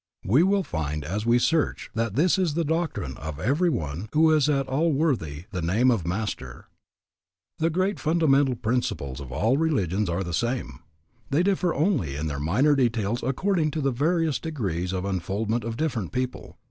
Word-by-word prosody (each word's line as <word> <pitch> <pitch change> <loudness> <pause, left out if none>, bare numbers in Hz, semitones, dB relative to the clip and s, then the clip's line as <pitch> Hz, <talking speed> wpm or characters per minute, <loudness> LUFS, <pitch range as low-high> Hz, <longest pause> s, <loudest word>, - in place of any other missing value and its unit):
We 125 - +4
will 195 +2 +3
find 75 - -3
as 105 +9 -3
we 120 +1 +5
search 160 +5 0
that 115 -2 -1
this 175 +7 +3
is 170 -6 0
the 170 - +1
doctrine 160 - -2
of 75 0 -6
every 145 - +2
one 80 - -3
who 160 +1 +5
is 150 -1 +3
at 135 -2 +1
all 155 +6 +1
worthy 120 - -1
the 90 -4 -3
name 110 +10 +3
of 95 -9 -1
master. 90 - -4 0.9
The 160 +1 +2
great 185 +4 0
fundamental 145 -5 +3
principles 110 - -2
of 65 -3 -8
all 115 - +1
religions 105 - 0
are 85 +3 -1
the 85 -1 -5
same. 120 - -2 0.5
They 150 +6 +2
differ 185 -3 +1
only 145 - +1
in 75 +2 -3
their 70 -2 -3
minor 120 - +3
details 120 -4 0
according 155 +5 0
to - - 0
the 135 -1 +1
various 160 +3 +1
degrees 95 - -3
of 95 0 -2
unfoldment 100 +5 -1
of 115 0 -4
different 125 - -2
people. 130 0 -4
120 Hz, 180 wpm, -25 LUFS, -, 0.9 s, we